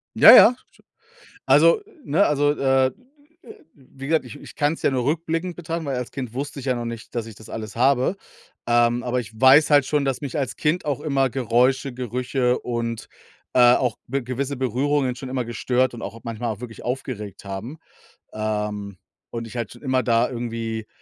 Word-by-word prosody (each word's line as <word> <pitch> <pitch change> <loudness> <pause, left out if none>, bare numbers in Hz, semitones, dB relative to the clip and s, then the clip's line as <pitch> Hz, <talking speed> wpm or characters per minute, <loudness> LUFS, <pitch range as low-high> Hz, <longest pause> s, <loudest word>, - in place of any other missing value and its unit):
Ja, - - +10
ja. 250 - +8 0.9
Also, 470 -4 +5 0.2
ne? 170 +8 +3
Also, 145 0 +2
äh, 135 -2 +2 0.8
wie 135 0 -12
gesagt, 160 +2 +1
ich - - -10
ich - - -13
kann 145 +1 +1
es - - -13
ja - - +3
nur 130 -2 -1
rückblickend 165 +4 -2
betrachten, 165 -1 -4
weil 135 -2 -2
als 125 -1 -4
Kind 125 -4 -6
wusste 140 +2 -5
ich 135 - -9
ja 130 - +2
noch 120 -1 -4
nicht, 115 -1 -7
dass 115 -2 -3
ich 110 - -10
das 110 +1 -14
alles 110 -2 -7
habe. 130 +7 +2 0.5
Ähm, 120 0 +3
aber 125 +1 -1
ich 110 -2 -11
weiß 135 +4 +7
halt 145 -3 +5
schon, 145 0 0
dass 135 -2 -1
mich 140 -2 -5
als 135 -5 -3
Kind 155 +4 0
auch 145 -4 -2
immer 135 -3 +1
Geräusche, 130 +3 +1
Gerüche 125 +1 -1
und, 115 -1 -4 0.5
äh, 120 -1 +7
auch 125 -4 0
be 135 +2 -2
gewisse 130 +3 -3
Berührungen 130 +1 0
schon 130 +1 -7
immer 130 -1 -2
gestört 125 +2 0
und 115 - -9
auch 115 +3 -7
manchmal 115 0 -3
auch 105 - -17
wirklich 115 -3 -9
aufgeregt 120 -6 -5
haben, 100 +10 -7 0.6
ähm, 105 -2 -3 0.3
und 115 -1 -5
ich 120 - -9
halt 115 -3 -3
schon 120 - -16
immer 130 -2 +1
da 115 +1 +2
irgendwie 115 -2 -4
125 Hz, 190 wpm, -23 LUFS, 115-140 Hz, 0.9 s, Ja